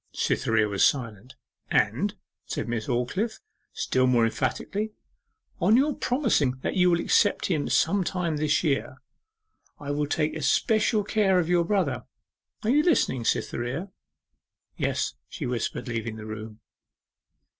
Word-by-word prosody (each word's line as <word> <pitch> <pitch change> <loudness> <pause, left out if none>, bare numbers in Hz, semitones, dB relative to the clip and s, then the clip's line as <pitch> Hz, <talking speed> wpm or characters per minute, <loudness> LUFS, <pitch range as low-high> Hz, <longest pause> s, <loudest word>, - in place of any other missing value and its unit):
Cytherea 110 -1 +1
was 100 -2 +1
silent. 120 -2 0 0.3
'And,' - - +1 0.3
said - - -3
Miss 115 -2 -3
Aldclyffe, 185 - -1 0.3
still 130 0 +1
more 120 -2 +4
emphatically, 210 - -2 0.7
'on 220 - +4
your 290 +3 +3
promising 230 - +1
that - - -1
you 180 -1 +4
will 170 -1 +3
accept 205 +4 +2
him 155 -4 0
some 200 -1 +2
time 175 -4 -2
this 150 +1 +1
year, 145 -4 -1 0.8
I 145 0 -4
will 145 0 -1
take 150 +1 0
especial 210 - +2
care 200 -2 +2
of 175 -2 +1
your 175 -1 +3
brother. 195 0 0 0.6
You 245 +7 +3
are - - +3
listening, 130 - +2
Cytherea?' 130 - -2 0.8
'Yes,' - - -1 0.2
she - - -5
whispered, 125 +1 -3
leaving 115 -2 -3
the 110 -1 -8
room. 110 0 -8
150 Hz, 135 wpm, -26 LUFS, 120-200 Hz, 0.8 s, more